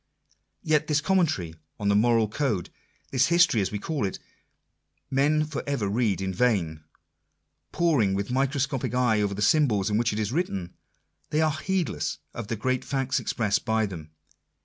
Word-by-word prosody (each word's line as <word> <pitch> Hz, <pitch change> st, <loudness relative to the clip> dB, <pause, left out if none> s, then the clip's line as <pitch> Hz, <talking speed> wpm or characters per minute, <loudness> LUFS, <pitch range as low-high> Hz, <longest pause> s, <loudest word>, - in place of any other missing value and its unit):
Yet 155 Hz, -2 st, +2 dB
this 150 Hz, -1 st, +2 dB
commentary 155 Hz, -, +1 dB, 0.3 s
on 105 Hz, -, -2 dB
the 100 Hz, -, +3 dB
moral 115 Hz, +1 st, +3 dB
code 110 Hz, -, -2 dB, 0.2 s
— -, -, -37 dB
this 130 Hz, -1 st, +3 dB
History 170 Hz, -, +4 dB
as 95 Hz, -, -1 dB
we 105 Hz, -, -2 dB
call 145 Hz, +6 st, -3 dB
it 95 Hz, -, -2 dB, 0.5 s
— -, -, -51 dB, 0.3 s
men 150 Hz, +3 st, +2 dB
for 150 Hz, -2 st, -4 dB
ever 140 Hz, -8 st, -1 dB
read 105 Hz, -2 st, 0 dB
in 95 Hz, 0 st, -2 dB
vain! 90 Hz, -8 st, 0 dB, 0.9 s
Poring 135 Hz, -, +2 dB
with 100 Hz, +3 st, -3 dB
micro 135 Hz, +2 st, +1 dB
scopic 135 Hz, -2 st, -1 dB
eye 120 Hz, -4 st, +2 dB
over 100 Hz, -1 st, -1 dB
the 105 Hz, -, -2 dB
symbols 110 Hz, -7 st, +3 dB
in 105 Hz, -, +2 dB
which 120 Hz, -1 st, +1 dB
it 105 Hz, -, -4 dB
is 110 Hz, 0 st, -1 dB
written, 100 Hz, -, -2 dB, 0.6 s
they 150 Hz, -, 0 dB
are 155 Hz, -1 st, +3 dB
heedless 165 Hz, -, -2 dB, 0.2 s
of 120 Hz, -3 st, -6 dB
the 115 Hz, -, -2 dB
great 130 Hz, +4 st, -1 dB
facts 135 Hz, -1 st, -1 dB
expressed 105 Hz, -3 st, 0 dB
by 110 Hz, 0 st, +1 dB
them. 85 Hz, -6 st, -8 dB
120 Hz, 180 wpm, -26 LUFS, 100-145 Hz, 0.9 s, History